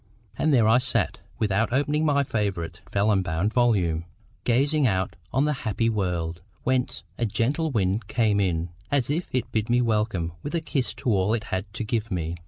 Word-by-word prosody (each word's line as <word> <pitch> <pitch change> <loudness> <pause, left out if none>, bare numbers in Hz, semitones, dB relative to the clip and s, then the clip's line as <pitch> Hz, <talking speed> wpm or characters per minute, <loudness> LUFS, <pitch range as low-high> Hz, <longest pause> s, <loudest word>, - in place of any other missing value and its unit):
And 155 - +1
there 120 -6 +5
I 115 +3 +6
sat, 130 - 0 0.2
without 110 +2 +1
opening 145 +4 +1
my 145 -2 +3
favourite 95 -9 -2
vellum 100 -1 +3
bound 90 +4 -1
volume, 90 -10 +2 0.4
gazing 140 +4 +3
out 95 -3 0 0.2
on 135 +3 +2
the 150 - +2
happy 115 0 0
world, 85 -5 -2 0.2
whence 130 -1 0 0.2
a 120 - +2
gentle 140 +10 0
wind 105 -4 0
came 110 -4 +2
in, 85 -3 0 0.2
as 140 -2 +1
if 170 +4 -2
to 125 -2 0
bid 110 0 -1
me 120 +1 +4
welcome 105 -8 0
with 150 - -4
a - - +2
kiss 140 -5 -2
to 125 - -1
all 100 +2 +2
it 110 - -3
had 95 +2 -2
to - - -2
give 110 0 -1
me. 85 -3 -2
110 Hz, 190 wpm, -25 LUFS, 95-130 Hz, 0.4 s, I